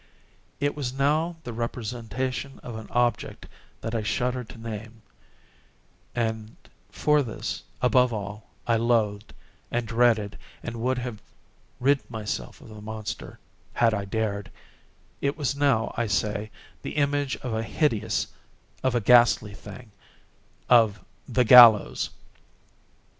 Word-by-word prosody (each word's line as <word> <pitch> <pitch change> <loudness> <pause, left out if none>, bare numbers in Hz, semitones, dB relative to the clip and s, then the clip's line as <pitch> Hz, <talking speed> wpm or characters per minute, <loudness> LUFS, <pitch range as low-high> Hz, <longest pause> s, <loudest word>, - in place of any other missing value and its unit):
It 145 0 0
was 130 -4 -3
now 150 +5 +1
the 120 - -6
representation 120 +3 -4
of 120 - -7
an 110 0 -7
object 120 0 0 0.4
that 115 - -4
I 115 - 0
shudder 125 +3 -1
to 115 - -13
name—and 110 0 -8 0.3
for 150 -1 +2
this, 115 -6 -4 0.2
above 125 0 +4
all, 105 -1 -6 0.2
I 115 -1 +2
loathed, 110 -3 +1 0.4
and 120 -1 -2
dreaded, 115 -3 +2 0.2
and 115 0 -5
would 130 +2 +1
have 120 -4 -5 0.6
rid 140 +2 +2
myself 110 -3 -5
of - - -13
the 105 -1 -10
monster 110 0 -6 0.4
had 115 -2 +3
I 100 -1 -2
dared—it 105 +6 -5
was 140 -2 -1
now, 140 -6 +2
I 120 -1 0
say, 105 +2 -1 0.3
the - - -6
image 145 -1 +1
of 125 -3 -3
a 110 - 0
hideous—of 115 +1 -2
a - - +3
ghastly 120 -2 +5
thing—of 105 0 -2 0.2
the 125 - +2
GALLOWS! 110 - +8
115 Hz, 120 wpm, -26 LUFS, 110-125 Hz, 0.6 s, GALLOWS